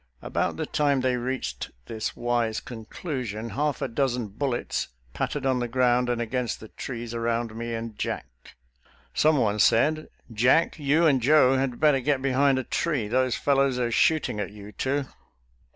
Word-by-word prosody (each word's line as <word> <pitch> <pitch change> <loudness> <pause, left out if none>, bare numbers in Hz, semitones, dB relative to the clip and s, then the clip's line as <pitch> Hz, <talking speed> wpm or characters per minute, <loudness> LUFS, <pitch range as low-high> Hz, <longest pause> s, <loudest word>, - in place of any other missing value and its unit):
About - - -1
the - - -2
time 145 -3 +1
they 130 -1 +1
reached 130 +2 -3 0.2
this 110 -1 -4
wise 120 -2 0
conclusion, 115 - -5
half 145 +4 -1
a - - 0
dozen 120 -3 -1
bullets 125 +4 -2 0.3
pattered - - -2
on 130 -1 +2
the 120 - -1
ground 125 0 +2
and 120 -1 0
against 120 0 -2
the 110 - -11
trees 120 -2 -6
around 115 -1 -1
me 115 0 -4
and 115 -1 -5
Jack. - - -2 0.9
Someone 125 -9 +2
said, 155 +9 +3
" 115 - -17
Jack, 160 +6 +4
you 150 +4 +3
and 135 -5 +4
Joe 135 0 +5
had 130 -2 -1
better 150 -3 +4
get 140 +1 +1
behind 135 0 +2
a 130 - -1
tree; 145 -5 -1
those 130 +2 +1
fel 140 +2 +1
lows 135 -2 +2
are 120 -1 0
shooting 155 -4 +2
at 100 - -2
you 105 0 -11
two."" 140 +4 -1
125 Hz, 170 wpm, -26 LUFS, 115-140 Hz, 0.9 s, Joe